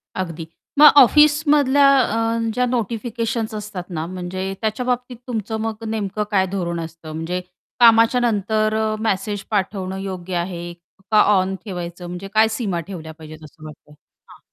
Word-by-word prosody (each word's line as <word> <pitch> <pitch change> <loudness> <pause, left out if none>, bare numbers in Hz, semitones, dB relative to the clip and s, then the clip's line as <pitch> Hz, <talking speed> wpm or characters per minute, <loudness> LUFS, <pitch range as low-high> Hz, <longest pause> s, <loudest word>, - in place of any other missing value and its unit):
अगदी. 165 -3 -4 0.3
मग 300 - +11
ऑफिसमधल्या 290 0 +5
अ, 230 -1 0 0.2
ज्या 250 +1 +1
नोटिफिकेशन्स 230 -1 -2
असतात 205 -4 -6
ना 160 -2 -4
म्हणजे 185 +1 -5
त्याच्याबाबतीत 245 +2 -2
तुमचं 220 -2 -3
मग 225 0 -4
नेमकं 210 -1 -2
काय 190 -2 +3
धोरण 170 -3 -2
असतं? 165 -1 -8
म्हणजे 170 +3 -3 0.4
कामाच्या 230 +1 +6
नंतर 215 -1 0
अ, 220 0 0
मेसेज 205 -1 -2
पाठवणं 190 -2 -2
योग्य 185 -2 -5
आहे 175 -1 -4 0.4
का, 215 - +6
ऑन 190 -2 +2
ठेवायचं 175 -2 -6
म्हणजे 180 +3 -7
काय 220 +1 +5
सीमा 210 -6 -2
ठेवल्या 160 -5 -8
पाहिजेत 155 0 -11
असं 155 +1 -14
वाटतं? 150 -1 -13 0.4
हां. - - -16
205 Hz, 145 wpm, -21 LUFS, 180-225 Hz, 0.4 s, मग